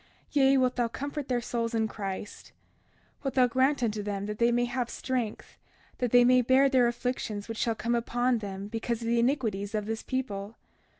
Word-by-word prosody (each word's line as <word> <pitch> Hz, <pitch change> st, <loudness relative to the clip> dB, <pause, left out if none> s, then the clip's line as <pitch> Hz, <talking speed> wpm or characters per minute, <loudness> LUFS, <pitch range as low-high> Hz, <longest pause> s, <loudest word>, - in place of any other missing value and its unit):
Yea, 275 Hz, -2 st, +4 dB
wilt 255 Hz, -1 st, +1 dB
thou 240 Hz, -1 st, +2 dB
comfort 285 Hz, +4 st, -5 dB
their 250 Hz, -2 st, +1 dB
souls 235 Hz, -1 st, -2 dB
in 220 Hz, -1 st, +1 dB
Christ. 200 Hz, -1 st, -6 dB, 0.7 s
31:33 -, -, -33 dB
Wilt 270 Hz, -, -1 dB
thou 255 Hz, -1 st, +6 dB
grant 260 Hz, +2 st, +2 dB
unto 215 Hz, -2 st, 0 dB
them 200 Hz, -1 st, -3 dB
that 210 Hz, 0 st, -5 dB
they 235 Hz, 0 st, +4 dB
may 240 Hz, 0 st, +2 dB
have 240 Hz, 0 st, -2 dB
strength, 245 Hz, -5 st, -4 dB, 0.4 s
that 245 Hz, -, 0 dB
they 245 Hz, 0 st, +7 dB
may 250 Hz, 0 st, +5 dB
bear 260 Hz, +3 st, +4 dB
their 255 Hz, -3 st, +4 dB
afflictions 235 Hz, -4 st, -3 dB
which 225 Hz, -1 st, -5 dB
shall 230 Hz, -1 st, +1 dB
come 235 Hz, +2 st, -1 dB
upon 240 Hz, +1 st, +1 dB
them 200 Hz, -1 st, -6 dB
because 225 Hz, +1 st, -3 dB
of -, -, -3 dB
the 235 Hz, 0 st, +2 dB
iniquities 225 Hz, -6 st, 0 dB
of 210 Hz, -1 st, -1 dB
this 220 Hz, +1 st, -3 dB
people. 220 Hz, -5 st, -4 dB
235 Hz, 200 wpm, -28 LUFS, 215-255 Hz, 0.7 s, they